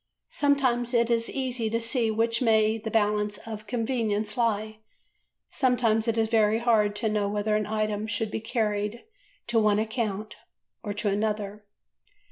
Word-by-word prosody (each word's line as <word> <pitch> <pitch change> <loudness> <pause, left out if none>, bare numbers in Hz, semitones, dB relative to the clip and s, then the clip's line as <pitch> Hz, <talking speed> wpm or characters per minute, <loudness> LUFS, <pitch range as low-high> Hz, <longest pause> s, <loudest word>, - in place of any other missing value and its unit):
Sometimes 255 -4 +1
it 235 0 +3
is 230 0 +1
easy 250 -4 -2
to 230 +1 0
see 230 0 0
which 230 +2 0
way 220 -2 +3
the 220 - -5
balance 210 -1 +1
of 215 -1 -7
convenience 220 -3 -1
lies, 220 -3 0 0.8
sometimes 240 -4 +1
it 230 0 0
is 225 -1 +2
very 220 -1 +3
hard 220 -3 +2
to 220 +2 -1
know 210 -1 0
whether 210 +1 0
an 215 0 0
item 215 0 -1
should 220 -1 -2
be 220 - -3
carried 215 -1 -2 0.4
to 235 -1 +2
one 210 -1 +3
account 215 -1 -3 0.4
or 205 - -4
to 210 +1 -2
another." 210 0 -2
220 Hz, 155 wpm, -27 LUFS, 210-230 Hz, 0.8 s, it